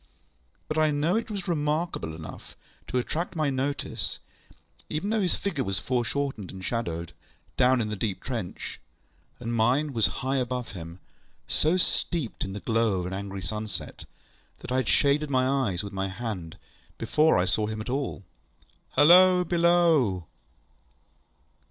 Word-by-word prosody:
But 155 0 0
I 155 0 +4
know 150 +5 +1
it 230 - -1
was 200 -4 -4
remarkable 150 - -1
enough 80 -1 -10 0.3
to - - -1
attract 165 +9 -2
my 155 -3 +1
notice, 135 +2 -2 0.7
even 190 +8 -2
though 220 -1 +2
his 185 - +2
figure 165 -9 -2
was 95 -4 -1
foreshortened 125 -3 -1
and 95 -1 -8
shadowed, 85 -8 -3 0.4
down 130 0 +4
in 110 -2 -1
the 105 - -2
deep 100 -2 -2
trench, 115 -9 -5 0.6
and 120 -1 -3
mine 130 +6 +2
was 115 -3 +3 0.2
high 135 +1 +1
above 125 -2 -2
him, 85 -3 -8 0.5
so 160 +4 +2
steeped 170 -7 -1
in 95 - -4
the 100 - -6
glow 115 -5 +1
of - - -4
an 90 - -4
angry 100 -1 -5
sunset, 105 +2 -5 0.6
that - - -7
I 130 - +2
had 130 -4 0
shaded 145 +1 +3
my 130 -1 +2 0.2
eyes 90 -1 -3
with 100 0 -7
my 95 0 -1
hand 95 -6 -5 0.4
before 155 +1 +3
I 90 - +3
saw 105 +4 +1
him 110 0 -4
at 110 - -5
all. 130 -5 -2 0.7
ŌĆ£Halloa! 180 +4 +7
Below! 165 - +3
125 Hz, 155 wpm, -27 LUFS, 100-155 Hz, 0.7 s, ŌĆ£Halloa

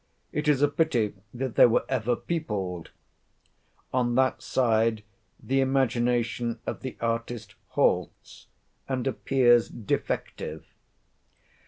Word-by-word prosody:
It 150 0 -2
is 145 -2 +3
a - - +6
pity 145 -8 +1 0.2
that 130 -1 -4
they - - +7
were 115 - +2
ever 125 -2 0
peopled. 100 - -3 1.0
On 120 -2 +1
that 130 0 +2
side, 115 -3 +1 0.4
the 135 +1 +1
imagination 120 -3 +1
of - - -4
the 130 - -6
artist 115 -2 -3
halts, - - -1 0.4
and 130 -2 -1
appears 120 -2 +3
defective. 110 -4 -3
120 Hz, 110 wpm, -27 LUFS, 115-135 Hz, 1.0 s, they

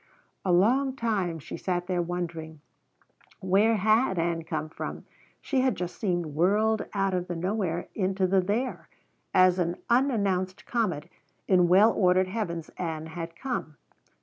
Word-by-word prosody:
A 185 - +1
long 255 +9 +3
time 205 -9 -1
she 155 - -8
sat 180 -1 -2
there 180 -1 0
wondering. 170 -3 -5 0.8
Where 200 +5 +3
had 215 0 +3
Ann 165 0 0
come 155 -1 -3
from? 155 - -7 0.4
She 265 -2 0
had 260 -4 +2
just 180 -1 -5
seemed 175 -5 0
whirled 200 +9 +1
out 195 -1 +1
of 180 -1 -1
the 175 - -4
nowhere 180 -1 -2
into 190 -1 0
the 190 +1 +3
there, 220 +8 -2 0.4
as 185 0 +5
an 175 0 0 0.2
unannounced 200 -7 +1
comet 205 -11 -1 0.4
in 180 -2 +4
well 200 +6 +6
ordered 185 -1 +3
heavens 170 -6 -3
Ann 160 -3 -3
had 165 +1 -7
come. 240 - -4
185 Hz, 150 wpm, -27 LUFS, 170-210 Hz, 0.8 s, well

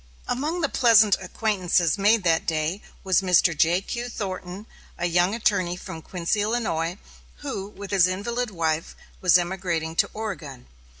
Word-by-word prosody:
Among 310 +7 -2
the 300 - +2
pleasant 220 -6 +5
acquaintances 185 -4 0
made 210 +1 +3
that 165 -2 +1
day, 160 +4 -1 0.2
was 190 -1 +3
Mr. 180 -2 +3
J.Q. 190 +10 0
Thornton, 190 -2 -6 0.3
a 175 - -2
young 175 +4 +2
attorney 185 -6 0
from 165 -2 -8
Quincy, 180 +5 -2
Illinois, 205 -6 -1 0.4
who, 260 -9 -4
with 200 -1 -10
his 190 -3 +5
invalid 235 +6 -2
wife, 165 -4 -2 0.3
was 180 -1 +6
emigrating 175 -3 -2
to - - +3
Oregon. 170 - -6
185 Hz, 140 wpm, -24 LUFS, 170-215 Hz, 0.4 s, was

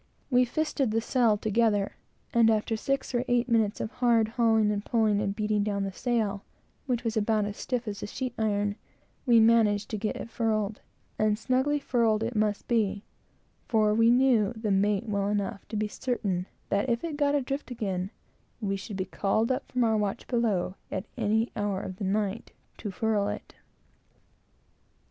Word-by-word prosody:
We 250 0 +5
fisted 280 0 -1
the 220 +1 +1
sail 230 -2 +2
together, 210 -1 +1 0.4
and 230 -1 +5
after 220 +1 +1
six 275 +4 -2
or 240 0 +1
eight 245 0 +2
minutes 220 -4 +2
of 215 - -3
hard 235 -3 +2
hauling 225 -2 +3
and 205 -1 -2
pulling 215 -3 +2
and 200 -1 -1
beating 210 -1 0
down 200 -1 -1
the 195 - -3
sail, 215 -2 -1 0.4
which 245 -2 0
was 225 -2 -1
as 210 -1 +1
stiff 245 -1 -3
as 205 -1 -4
sheet 255 -2 -3
iron, 205 -1 0 0.5
we 235 -2 +6
managed 220 -2 +4
to 215 - -2
get 215 +1 -2
it 230 - -7
furled; 215 -3 -1 0.4
and 215 -1 +2
snugly 260 +5 +1
furled 230 -6 +1
it 230 +1 -3
must 210 -1 0
be, 210 -4 +1 0.6
for 215 -2 +3
we 230 +1 +4
knew 245 -4 +4
the 220 -2 -2
mate 205 +3 +2
well 200 -1 0
enough 205 0 -2
to - - -6
be 210 0 0
certain 205 -6 -2 0.2
that 200 +6 +1
if 235 0 0
it 330 -3 -3
got 290 -1 +2
adrift 275 0 -2
again, 195 -6 -3 0.5
we 200 -3 -1
should 195 +1 -6
be 185 - -1
called 215 +5 0
up 255 - -3
from 250 -1 +1
our 220 -1 +3
watch 205 -2 -2
below, 215 -7 0 0.2
at 190 +2 -3
any 220 -1 +1
hour 205 -2 -1
of 185 -1 -6
the 200 - -3
night, 205 +2 -1 0.2
to 210 - -6
furl 205 +1 0
it. - - -6
220 Hz, 175 wpm, -28 LUFS, 205-235 Hz, 0.6 s, we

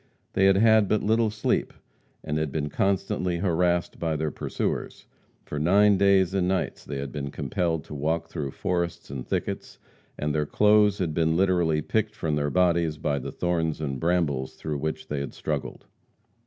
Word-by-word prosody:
They 95 - +3
had 95 0 +5
had 110 -1 +5
but 110 - +1
little 110 +1 +2
sleep, 110 +1 -1 0.5
and 75 0 -2
had 75 -2 -2
been 75 -1 -2
constantly 95 0 0
harassed 90 -1 0
by 80 -2 -1
their 75 0 -1
pursuers. - - -3 0.4
For 75 - -4
nine 100 +5 +4
days 100 -2 +4
and 95 -2 +1
nights 95 0 -1
they 70 - -5
had 70 0 -5
been 70 -2 -4
compelled 80 +1 -2
to - - -10
walk 80 +3 -1
through 70 -2 -4
forests 85 +1 -3
and 65 -3 -6
thickets, - - -3 0.4
and 75 0 -1
their 75 -1 0
clothes 105 +1 +4
had 90 -6 -1
been 80 +1 +1
literally 85 -5 +2
picked 110 +3 -1
from 80 -8 -1
their 75 0 0
bodies 85 -2 +2
by 75 -1 -1
the - - -6
thorns 85 -3 -1
and 70 -4 -3
brambles 80 -6 0
through 75 -2 -4
which 80 +2 -4
they 75 - -3
had 70 -1 -5
struggled. - - -4
85 Hz, 180 wpm, -26 LUFS, 75-95 Hz, 0.5 s, had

